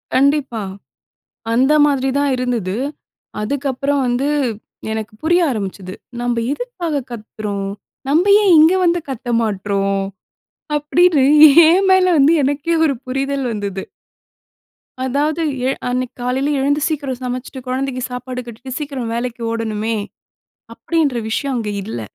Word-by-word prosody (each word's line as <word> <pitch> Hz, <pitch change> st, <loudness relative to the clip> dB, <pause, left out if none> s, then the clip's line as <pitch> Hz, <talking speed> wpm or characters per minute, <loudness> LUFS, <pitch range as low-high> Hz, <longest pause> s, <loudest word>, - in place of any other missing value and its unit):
கண்டிப்பா. 275 Hz, -4 st, +2 dB, 0.9 s
அந்த 260 Hz, +5 st, +3 dB
மாதிரி 270 Hz, -2 st, +1 dB
தான் 285 Hz, -1 st, +1 dB
இருந்தது. 235 Hz, -7 st, -2 dB, 0.7 s
அதுக்கப்புறம் 280 Hz, +3 st, -1 dB
வந்து 245 Hz, +4 st, 0 dB, 0.6 s
எனக்கு 220 Hz, -1 st, -4 dB
புரிய 345 Hz, +3 st, +3 dB
ஆரம்பிச்சது. 195 Hz, -4 st, -5 dB, 0.3 s
நம்ப 240 Hz, -1 st, -1 dB, 0.2 s
எதுக்காக 340 Hz, -, -3 dB
கத்துறோம்? 210 Hz, -3 st, -5 dB, 0.4 s
நம்ப 315 Hz, +6 st, +3 dB, 0.2 s
ஏன் 390 Hz, -, +5 dB
இங்க 320 Hz, +4 st, +6 dB
வந்து 345 Hz, 0 st, +2 dB
கத்த 255 Hz, -2 st, -6 dB
மாட்றோம்? 195 Hz, -1 st, -1 dB, 0.8 s
அப்படினு 300 Hz, 0 st, +3 dB, 0.4 s
ஏன் 380 Hz, +4 st, +4 dB
மேல 375 Hz, -1 st, +5 dB
வந்து 290 Hz, +4 st, +5 dB
எனக்கே 290 Hz, +5 st, 0 dB
ஒரு 280 Hz, -, +2 dB
புரிதல் 275 Hz, +1 st, -2 dB
வந்தது. 200 Hz, -3 st, -4 dB, 1.2 s
அதாவது 295 Hz, +5 st, 0 dB, 0.3 s
எழு 270 Hz, -, 0 dB
அன்னைக்கு 250 Hz, 0 st, -2 dB
காலையில 265 Hz, +4 st, 0 dB
எழுந்து, 285 Hz, +2 st, +1 dB
சீக்கிரம் 280 Hz, -5 st, -3 dB
சமச்சுட்டு 255 Hz, +1 st, -5 dB
கொழந்தைக்கு 255 Hz, 0 st, -2 dB
சாப்பாடு 250 Hz, 0 st, -5 dB
கட்டிட்டு, 245 Hz, +3 st, -8 dB
சீக்கிரம் 270 Hz, -6 st, -4 dB
வேலைக்கு 240 Hz, 0 st, -4 dB
ஓடணுமே, 225 Hz, -1 st, -2 dB, 0.8 s
அப்படின்ற 300 Hz, -7 st, 0 dB
விஷயம் 275 Hz, +3 st, -1 dB
அங்க 220 Hz, -3 st, -2 dB
இல்ல. 200 Hz, -, -5 dB
260 Hz, 120 wpm, -18 LUFS, 230-290 Hz, 1.2 s, இங்க